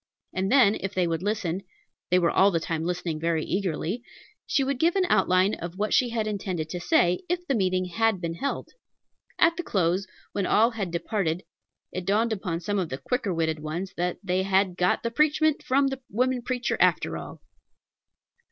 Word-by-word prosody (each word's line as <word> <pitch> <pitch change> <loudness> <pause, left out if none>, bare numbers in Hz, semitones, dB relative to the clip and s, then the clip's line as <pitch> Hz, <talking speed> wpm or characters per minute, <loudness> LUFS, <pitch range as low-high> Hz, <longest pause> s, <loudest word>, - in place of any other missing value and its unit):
And 190 +2 -1
then, 245 -7 +6
if 195 +1 -4
they 185 -1 +2
would 165 -1 -1
listen, 195 -3 -1 0.5
they 180 - +4
were 170 -2 +3
all 195 - +5
the 170 -4 0
time 165 -1 -3
listening 175 -3 -2
very 165 -1 0
eagerly, 190 +3 -2 0.5
she 275 - +2
would 270 -1 -1
give 335 +4 +3
an 380 -2 +3
outline 190 0 +3
of 170 +2 -6
what 210 +1 -1
she 250 -2 +4
had 225 -2 -1
intended 190 -6 -3
to 180 - -4
say, 175 +1 +2
if 355 0 -1
the 275 - 0
meeting 185 -4 +1
had 220 +2 +1
been 170 -1 -3
held. 275 +12 -3 0.7
At 330 0 +4
the 350 - -2
close, 185 - 0 0.2
when 200 -2 -1
all 225 +3 +4
had 210 -6 -3
departed, 175 0 -1 0.5
it 185 -1 -5
dawned 220 +3 +2
upon 180 -5 -3
some 205 +1 -1
of 175 -4 -2
the 130 - -4
quicker 205 - -2
witted 160 -2 0
ones 160 +5 -4
that 175 +1 -1
they 185 -1 +1
"had 190 -1 +2
got 180 0 +1
the 235 - -1
preachment 305 +3 +2
from 275 +1 +2
the 270 -1 -5
woman 250 +3 0
preacher, 250 0 -2
after - - +2
all." - - -8
190 Hz, 195 wpm, -26 LUFS, 175-230 Hz, 0.7 s, then